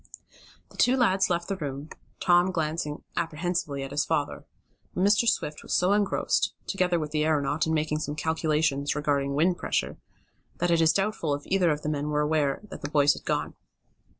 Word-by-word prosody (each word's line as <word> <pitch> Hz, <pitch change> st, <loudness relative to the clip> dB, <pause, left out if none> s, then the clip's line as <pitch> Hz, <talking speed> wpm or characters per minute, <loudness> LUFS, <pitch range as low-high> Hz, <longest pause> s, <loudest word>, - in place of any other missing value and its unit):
The -, -, -16 dB
two 250 Hz, +2 st, +4 dB
lads 195 Hz, -6 st, +3 dB
left 170 Hz, -1 st, -1 dB
the 195 Hz, -, -2 dB
room, 145 Hz, -2 st, -5 dB, 0.3 s
Tom 175 Hz, +1 st, +4 dB
glancing 155 Hz, -3 st, -3 dB
apprehensively 160 Hz, -3 st, -2 dB
at 135 Hz, -, -7 dB
his 145 Hz, +2 st, +1 dB
father. 145 Hz, -1 st, -2 dB, 0.5 s
But 180 Hz, -, 0 dB
Mr. 205 Hz, +3 st, +3 dB
Swift 150 Hz, -10 st, -2 dB
was -, -, -2 dB
so 180 Hz, +3 st, +3 dB
engrossed, 205 Hz, -1 st, +1 dB
together 180 Hz, -3 st, +1 dB
with 155 Hz, -2 st, -4 dB
the 150 Hz, 0 st, +1 dB
aeronaut, 150 Hz, 0 st, +1 dB
in 160 Hz, -, 0 dB
making 150 Hz, 0 st, 0 dB
some 150 Hz, -1 st, -4 dB
calculations 155 Hz, -3 st, 0 dB
regarding 140 Hz, -2 st, 0 dB
wind 175 Hz, +4 st, +2 dB
pressure, -, -, -2 dB, 0.6 s
that 175 Hz, -, 0 dB
it 165 Hz, -1 st, +3 dB
is 160 Hz, 0 st, +5 dB
doubtful 195 Hz, -6 st, 0 dB
if 145 Hz, -, -9 dB
either 185 Hz, -3 st, +2 dB
of 150 Hz, -1 st, -1 dB
the 150 Hz, -, -1 dB
men 150 Hz, -1 st, -2 dB
were 150 Hz, 0 st, +1 dB
aware 150 Hz, -2 st, 0 dB
that -, -, -8 dB
the 145 Hz, -, -4 dB
boys 145 Hz, -1 st, +4 dB
had -, -, -11 dB
gone. -, -, -1 dB
155 Hz, 190 wpm, -27 LUFS, 150-180 Hz, 0.6 s, is